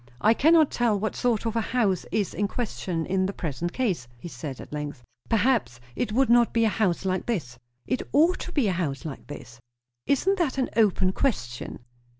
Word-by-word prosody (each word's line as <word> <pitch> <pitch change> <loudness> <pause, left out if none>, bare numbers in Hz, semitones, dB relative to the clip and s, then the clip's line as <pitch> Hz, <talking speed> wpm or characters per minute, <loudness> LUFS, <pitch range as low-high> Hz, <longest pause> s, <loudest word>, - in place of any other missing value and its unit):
"I 220 - +5
cannot 315 +4 +5
tell 230 -4 +1
what 215 +2 -2
sort 235 -3 0
of 225 0 -1
a 230 - +2
house 215 -6 0
is 205 -4 0
in 205 +4 0
question 185 -7 -3
in 190 +1 +1
the 200 - -4
present 165 +1 -3
case," 195 - -1
he 120 - -9
said 135 -2 -7
at - - -10
length. 145 -4 -5 0.3
"Perhaps 225 - +1 0.2
it - - -2
would 260 +4 +3
not 235 0 +4
be 230 -1 +3
a - - +4
house 195 -4 0
like 185 -1 -1
this." 145 - -3 0.3
"It 255 - -1
ought 330 +6 +4
to - - -6
be 280 -10 +1
a - - +2
house 155 -6 -3
like 150 -4 -7
this." 120 -4 -10 0.5
"Isn't 380 +8 +2
that 300 -6 0
an 260 - 0
open 195 -4 +3
question?" 120 - -2
205 Hz, 200 wpm, -26 LUFS, 165-245 Hz, 0.5 s, I